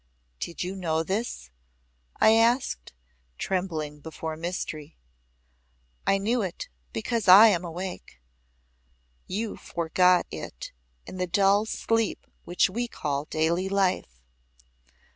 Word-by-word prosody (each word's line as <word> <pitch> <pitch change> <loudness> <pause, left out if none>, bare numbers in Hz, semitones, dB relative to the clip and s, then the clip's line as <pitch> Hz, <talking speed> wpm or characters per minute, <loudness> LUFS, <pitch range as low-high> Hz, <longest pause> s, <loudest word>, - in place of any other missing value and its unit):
"Did 170 - -4
you 185 +2 -4
know 165 -4 -1
this?" 190 - -3 0.7
I 220 - +6
asked, 230 - +2 0.5
trembling 160 -6 -3
before 160 +1 -6
mystery. 160 -2 -5 1.1
"I 195 - +4
knew 225 +5 0
it, 185 -4 -5 0.2
because 220 - -2
I 200 +5 +10
am 180 -4 +1
awake. 175 - -7 1.1
You 210 +3 -3
forgot 180 +2 +2
it - - -7 0.3
in - - -8
the 180 0 -1
dull 200 +4 +3
sleep 225 0 -1 0.2
which 175 +1 +2
we 235 +5 -3
call 145 -9 -3
daily 170 +5 0
life. 185 - 0
180 Hz, 110 wpm, -27 LUFS, 160-200 Hz, 1.1 s, I